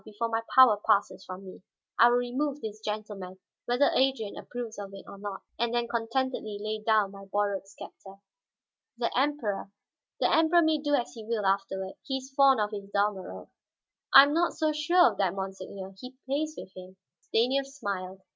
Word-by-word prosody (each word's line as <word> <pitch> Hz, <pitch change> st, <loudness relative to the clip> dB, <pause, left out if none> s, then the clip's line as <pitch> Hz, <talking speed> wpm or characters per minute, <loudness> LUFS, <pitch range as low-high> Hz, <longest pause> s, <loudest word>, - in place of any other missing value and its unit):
Before 215 Hz, +2 st, -4 dB
my 225 Hz, 0 st, 0 dB
power 255 Hz, -5 st, +8 dB
passes 200 Hz, -2 st, +1 dB
from 185 Hz, +1 st, -9 dB
me, 185 Hz, -, -11 dB, 0.4 s
I 235 Hz, -, +9 dB
will 240 Hz, -, +3 dB
remove 265 Hz, +4 st, -2 dB
this 215 Hz, -4 st, -7 dB
gentleman, 210 Hz, -3 st, -5 dB, 0.3 s
whether 245 Hz, +4 st, +3 dB
Adrian 260 Hz, -6 st, +1 dB
approves 235 Hz, -3 st, -7 dB
of 200 Hz, -1 st, -7 dB
it 195 Hz, -, -11 dB
or 200 Hz, -, -11 dB
not; 200 Hz, -1 st, -6 dB, 0.2 s
and 235 Hz, 0 st, 0 dB
then 240 Hz, 0 st, 0 dB
contentedly 230 Hz, -2 st, -2 dB
lay 215 Hz, +1 st, -3 dB
down 215 Hz, -2 st, +2 dB
my 195 Hz, 0 st, -11 dB
borrowed 200 Hz, 0 st, -1 dB
scepter." 195 Hz, -1 st, -12 dB, 0.8 s
"The 235 Hz, -1 st, -2 dB
Emperor 250 Hz, -8 st, -1 dB, 0.2 s
" -, -, -64 dB
"The -, -, +2 dB
Emperor 325 Hz, +2 st, +5 dB
may 315 Hz, -1 st, +2 dB
do 290 Hz, 0 st, +1 dB
as 245 Hz, -4 st, -2 dB
he 225 Hz, -, -9 dB
will, 215 Hz, -2 st, -2 dB
afterward. 195 Hz, 0 st, -1 dB
He 265 Hz, -, -2 dB
is 265 Hz, +1 st, -10 dB
fond 275 Hz, -3 st, +5 dB
of 210 Hz, 0 st, 0 dB
his 200 Hz, -2 st, -7 dB
Dalmorov." 200 Hz, -2 st, -2 dB, 0.6 s
"I 275 Hz, -, +11 dB
am 285 Hz, +1 st, +1 dB
not 340 Hz, +1 st, +2 dB
so 310 Hz, -1 st, 0 dB
sure 340 Hz, +4 st, +4 dB
of -, -, -12 dB
that, 190 Hz, -2 st, +1 dB
monseigneur; 190 Hz, 0 st, -6 dB
he 255 Hz, +3 st, -10 dB
plays 305 Hz, +4 st, -2 dB
with 190 Hz, -, -10 dB
him." 185 Hz, 0 st, -11 dB, 0.2 s
Stanief 265 Hz, +4 st, +1 dB
smiled. 195 Hz, -8 st, -5 dB
220 Hz, 185 wpm, -28 LUFS, 195-265 Hz, 0.8 s, I